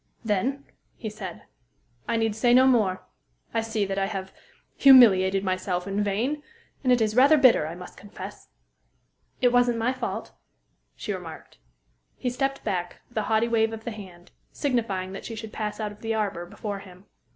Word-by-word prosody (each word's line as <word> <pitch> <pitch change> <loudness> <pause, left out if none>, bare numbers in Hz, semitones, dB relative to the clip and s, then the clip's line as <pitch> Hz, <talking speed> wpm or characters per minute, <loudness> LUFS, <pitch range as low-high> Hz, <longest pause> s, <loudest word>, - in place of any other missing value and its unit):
"Then," 250 +7 -1 0.3
he 220 -3 -6
said, 195 -5 -8 0.6
"I 230 0 +1
need 225 -2 0
say 240 +2 +4
no 260 +1 +7
more. 215 -8 +2 0.5
I 225 - +1
see 220 -2 -1
that 195 0 -2
I 195 - 0
have 190 -2 -5 0.4
humiliated 195 -8 +7
myself 185 -1 -1
in 200 +1 -1
vain; 235 +9 -1 0.4
and 255 - +3
it 245 -2 +4
is 215 -1 +1
rather 280 +5 +6
bitter, 255 - +5
I 165 - -6
must 180 0 -11
confess." 205 0 -10 0.9
"It 245 -1 +4
wasn't 245 -1 +3
my 235 +3 +1
fault," 260 - -4 0.6
she 210 - -4
remarked. 170 -4 -9 0.6
He 250 - -2
stepped 270 +2 -2
back, 180 -4 -3
with 240 - -12
a 215 - -3
haughty 220 +1 +3
wave 225 -1 +1
of 220 0 -7
the 235 - -4
hand, 185 -5 -11 0.2
signifying 220 -9 -1
that 195 - -7
she 225 - -6
should 220 0 -8
pass 210 -1 -4
out 210 -1 -3
of 210 +1 -15
the 225 0 -1
arbor 195 -5 -2
before 205 +2 -5
him. 185 -1 -14
215 Hz, 180 wpm, -26 LUFS, 195-240 Hz, 0.9 s, no